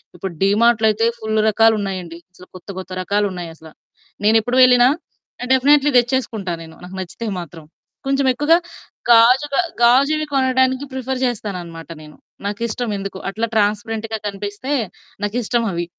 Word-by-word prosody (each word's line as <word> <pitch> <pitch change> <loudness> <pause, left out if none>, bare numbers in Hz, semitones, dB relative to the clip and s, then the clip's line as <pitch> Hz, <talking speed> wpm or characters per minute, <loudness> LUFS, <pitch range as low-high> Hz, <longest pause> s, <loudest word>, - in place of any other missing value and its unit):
ఇప్పుడు 180 0 -6
డీమార్ట్‌లో 220 +3 +3
అయితే 225 +2 +1
ఫుల్ 220 0 -1
రకాలు 225 +1 +4
ఉన్నాయండి. 180 -4 -5
అసలు 180 0 -16
కొత్త 185 - -17
కొత్త 185 0 -9
రకాలు 205 +2 +1
ఉన్నాయసల 165 -2 -9 0.6
నేనెప్పుడు 225 +3 +3
వెళ్ళినా 250 -1 +6 0.7
డెఫినిట్‌లీ 285 +2 +4
తెచ్చేసుకుంటా 235 -6 -2
నేను. 160 0 -13
నాకు 185 +1 -9
నచ్చితే 205 +5 -7
మాత్రం 165 -1 -11 0.4
కొంచెం 275 0 +1
ఎక్కువగా 295 +6 +3 0.5
గాజు 240 +4 +6
గ - - +1 0.2
గాజువి 280 +6 +4
కొనడానికి 260 0 +2
ప్రిఫర్ 260 0 -4
చేస్తానన్నమాట 180 -9 -5
నేను. 150 -1 -14 0.3
నాకిష్టం 230 +3 -3
ఎందుకో. 195 -1 -6
అట్లా 220 +4 -2
ట్రాన్స్‌పరెంట్‌గా 220 +1 -1
కనిపిస్తే 205 +6 -5 0.5
నాకిష్టం 235 +2 -1
అవి. 175 0 -3
220 Hz, 130 wpm, -19 LUFS, 195-250 Hz, 0.7 s, వెళ్ళినా